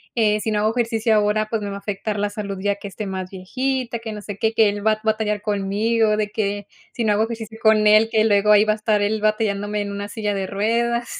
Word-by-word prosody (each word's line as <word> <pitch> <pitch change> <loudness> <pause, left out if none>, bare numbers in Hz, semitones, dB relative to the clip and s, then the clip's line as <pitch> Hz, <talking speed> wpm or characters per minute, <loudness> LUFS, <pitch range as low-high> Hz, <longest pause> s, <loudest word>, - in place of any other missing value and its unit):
eh, 215 -2 +2
si 220 - -2
no 210 - +1
hago 215 +1 +2
ejercicio 225 -2 +1
ahora 210 +1 +1
pues 225 -1 -2
me 205 - -4
va 200 - -5
a - - -8
afectar 205 +1 -4
la 205 0 0
salud, 205 -1 -5
ya 200 +1 0
que 200 0 -8
esté 210 +2 -6
más 190 -1 -5
viejita, 250 +6 -3
que 225 -1 -6
no 210 -1 -7
sé 205 -1 -7
qué, 220 +1 +1
que 220 -1 +4
él 205 0 -3
va 220 - +5
a 215 - -6
batallar 215 -1 0
conmigo 210 +2 +1
de 210 -1 -1
que, 205 -2 -2 0.2
si 235 - -3
no 210 - +3
hago 210 +1 +2
ejercicio 225 -1 -6
con 215 -1 +4
él, 215 +1 +5
que 220 -1 +3
luego 210 -1 +3
ahí 210 0 +6
va 215 - +2
a - - -3
estar 215 -1 0
el 210 +1 0
batallándome 210 -1 0
en 205 - -4
una 200 0 -5
silla 210 -1 -2
de 195 -1 -3
ruedas 235 +4 0
210 Hz, 265 wpm, -21 LUFS, 205-220 Hz, 0.2 s, ahí